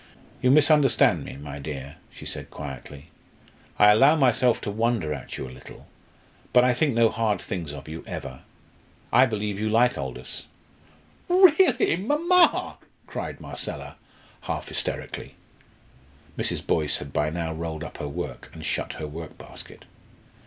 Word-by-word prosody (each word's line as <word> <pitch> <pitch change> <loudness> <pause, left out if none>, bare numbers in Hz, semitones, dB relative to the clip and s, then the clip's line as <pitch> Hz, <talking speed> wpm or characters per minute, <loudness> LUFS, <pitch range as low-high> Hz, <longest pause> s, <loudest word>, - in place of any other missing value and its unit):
"You 125 - +3
misunderstand 145 -2 +5
me, - - -8
my 70 0 -8
dear," 70 0 -7
she - - -12
said - - -4
quietly. 70 +2 -9 0.7
"I 105 0 +7
allow 135 +9 +6
myself 125 -4 +3
to 105 - -3
wonder 110 -7 0
at - - -7
you 65 - -5
a - - -10
little, 65 - -13 0.7
but 125 - +7
I 125 0 +4
think 135 0 +1
no 115 -1 +5
hard 110 -2 0
things 85 -6 -5
of 75 0 -9
you 80 +1 -7
ever. 65 -1 -6 0.7
I 130 +2 +7
believe 105 -3 -3
you 110 +1 0
like 120 +3 +3
Aldous." 65 -2 -6 0.8
"Really, 365 - +5
mamma!" 325 - +3 0.3
cried - - -6
Marcella, - - -6 0.5
half - - -4
hysterically. - - -4 1.0
Mrs. - - -2
Boyce 75 -2 +2
had 70 -1 -8
by 75 +1 +1
now 80 0 -3
rolled 80 -1 -5
up - - -9
her 75 - -4
work 70 - -6
and 80 -1 -8
shut 70 - -2
her 75 - -6
workbasket. 80 +1 -9
105 Hz, 145 wpm, -25 LUFS, -, 1.0 s, I